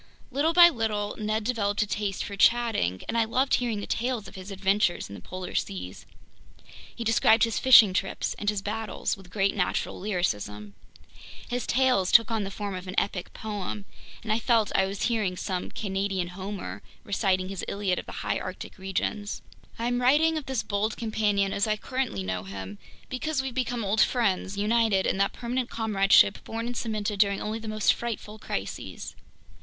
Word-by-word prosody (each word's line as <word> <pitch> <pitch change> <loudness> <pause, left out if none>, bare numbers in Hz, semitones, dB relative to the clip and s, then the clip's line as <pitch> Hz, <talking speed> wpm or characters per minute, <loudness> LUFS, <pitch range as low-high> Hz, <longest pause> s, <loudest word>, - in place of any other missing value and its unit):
Little 285 +5 +2
by 345 0 +10
little 215 -7 -2
Ned 215 +1 -1
developed 210 -3 0
a - - -3
taste 205 -2 -2
for 200 - -6
chatting, 220 - +2
and 225 - -3
I 230 - +4
loved 255 +5 +1
hearing 230 -4 +1
the - - -4
tales 240 -3 -2
of - - -12
his 190 0 -9
adventures 195 - +1
in - - -9
the - - -9
polar 185 0 -7
seas. 90 -1 -4 0.9
He 235 - -4
described 225 0 +4
his 230 -1 +1
fishing 225 -7 +8
trips 195 0 -1
and 205 - 0
his 205 -2 -2
battles 215 -1 -2
with 195 -2 -15
great 195 0 +1
natural 180 -3 -1
lyricism. 105 - -2 0.8
His 245 0 -2
tales 250 -7 +2
took 230 -1 +6
on 220 -2 0
the 195 - -4
form 200 0 -5
of 185 0 -6
an 185 - -5
epic 185 -3 -3
poem, 205 -1 -5 0.4
and 215 -1 0
I 220 - +1
felt 230 -3 +2
I 190 - +3
was 195 0 -4
hearing 215 -6 0
some 185 -1 -3
Canadian 195 -3 -2
Homer 195 +2 -6 0.2
reciting 190 -2 0
his 195 -2 -5
Iliad 200 -2 -1
of - - -9
the - - -7
High - - 0
Arctic - - -7
regions. 200 +2 -3 0.3
I'm 245 +2 0
writing 300 +6 +4
of 310 -3 -4
this 265 -3 -1
bold 210 +1 -1
companion 210 -3 0
as 200 +3 +1
I 215 0 +1
currently 255 - -2
know 95 -1 -2
him. 95 +1 -7 0.3
Because 265 +2 -2
we've 265 -2 -4
become 245 -2 -1
old 205 +3 +2
friends, 200 -5 +1
united 215 -2 +2
in - - +1
that 200 0 +2
permanent 245 +1 -2
comradeship 205 -2 +4
born 225 +1 -4
and 245 +1 -4
cemented 215 -3 -2
during 200 -1 +3
only 215 +1 -3
the 225 - -8
most 215 -1 +3
frightful 220 -2 -5
crises! - - -5
210 Hz, 185 wpm, -27 LUFS, 195-230 Hz, 0.9 s, by